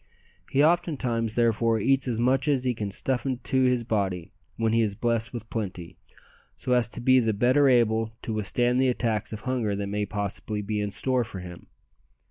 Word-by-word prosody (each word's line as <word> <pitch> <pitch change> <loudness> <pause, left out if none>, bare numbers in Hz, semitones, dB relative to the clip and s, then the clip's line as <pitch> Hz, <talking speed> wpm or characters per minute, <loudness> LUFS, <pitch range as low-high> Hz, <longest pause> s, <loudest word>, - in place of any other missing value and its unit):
He 140 +2 +3
oftentimes 130 -10 +1
therefore 115 -1 +2
eats 135 +5 +1
as 115 -2 -1
much 130 +4 +2
as 140 -3 +2
he 125 -1 +1
can 105 -3 -4
stuff 125 +6 -1
into 130 0 +1
his 125 -2 +2
body 95 -6 -2 0.3
when 115 -1 +1
he 115 - +3
is 105 -3 0
blessed 115 +1 -1
with 115 -2 -7
plenty, 95 -6 -5 0.6
so 125 - -4
as 125 -1 +3
to - - -9
be 130 +1 +5
the 115 -3 +1
better 125 +7 +3
able 115 -2 +2
to 110 - -3
withstand 120 +5 +1
the 130 - +3
attacks 115 -3 -1
of 110 -1 -6
hunger 120 -6 -1
that 100 0 -3
may 105 +1 -2
possibly 105 +1 -3
be 105 +1 -2
in 105 - -2
store 130 +4 0
for 110 -4 -8
him. 90 -1 -10
115 Hz, 195 wpm, -26 LUFS, 105-125 Hz, 0.6 s, be